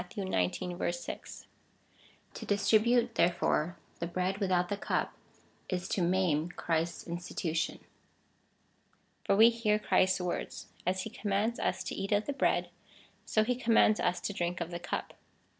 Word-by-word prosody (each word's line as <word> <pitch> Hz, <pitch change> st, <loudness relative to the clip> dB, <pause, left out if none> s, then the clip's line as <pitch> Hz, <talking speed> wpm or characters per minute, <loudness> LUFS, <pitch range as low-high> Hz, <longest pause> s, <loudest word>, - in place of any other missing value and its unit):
xix. 175 Hz, -, -1 dB
6.) -, -, -8 dB, 0.9 s
To -, -, -7 dB
distri 210 Hz, +1 st, +4 dB
bute, 240 Hz, 0 st, +2 dB
therefore, 175 Hz, -2 st, +1 dB, 0.2 s
the 170 Hz, -, -2 dB
bread 185 Hz, +3 st, -1 dB
without 180 Hz, -3 st, +1 dB
the 205 Hz, -, 0 dB
cup, 200 Hz, -, -1 dB, 0.6 s
is 180 Hz, -1 st, -2 dB
to 190 Hz, -, 0 dB
maim 175 Hz, -3 st, +2 dB
Christ's 165 Hz, -1 st, -2 dB
institution.^ 170 Hz, -1 st, -3 dB, 1.4 s
For -, -, +3 dB
we 225 Hz, +3 st, +8 dB
hear 225 Hz, -2 st, +1 dB
Christ's 190 Hz, -3 st, +2 dB
words. 180 Hz, -1 st, -4 dB, 0.2 s
As 185 Hz, 0 st, +1 dB
he 220 Hz, -, -6 dB
commands 210 Hz, +3 st, -1 dB
us -, -, -1 dB
to -, -, -4 dB
eat 195 Hz, -, -4 dB
of 205 Hz, +1 st, +2 dB
the 285 Hz, -, -2 dB
bread, -, -, +1 dB, 0.6 s
so 215 Hz, -, +3 dB
he 245 Hz, +3 st, +1 dB
commands 230 Hz, -3 st, +4 dB
us 180 Hz, 0 st, +1 dB
to 205 Hz, -, -3 dB
drink 175 Hz, -2 st, -2 dB
of 170 Hz, 0 st, -4 dB
the 175 Hz, -, -4 dB
cup. 175 Hz, -, -4 dB
185 Hz, 150 wpm, -31 LUFS, 175-210 Hz, 1.4 s, we